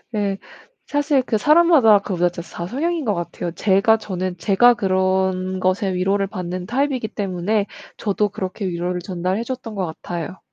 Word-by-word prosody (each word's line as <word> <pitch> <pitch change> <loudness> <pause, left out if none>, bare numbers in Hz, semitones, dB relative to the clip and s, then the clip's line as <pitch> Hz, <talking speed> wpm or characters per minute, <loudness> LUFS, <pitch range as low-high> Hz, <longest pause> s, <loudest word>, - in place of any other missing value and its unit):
예. 200 -2 0 0.5
사실 290 -2 +1
그 230 -3 -1
사람마다 300 - +6
그보다도 175 -3 -1
다 170 +1 -7
성향인 320 - -1
것 210 -4 +1
같아요. 175 0 -4
제가 200 +5 +3
저는 185 -3 -4
제가 230 +6 +5
그런 185 -1 0
것에 185 +1 0
위로를 195 +2 +1
받는 180 -2 -5
타입이기 255 -1 -1
때문에 200 +1 -1 0.3
저도 205 0 0
그렇게 190 +1 -5
위로를 180 0 -2
전달해 185 +4 -2
줬던 245 -3 -6
것 190 -2 -1
같아요. 170 +2 -6
195 Hz, 335 characters per minute, -21 LUFS, 185-220 Hz, 0.5 s, 사람마다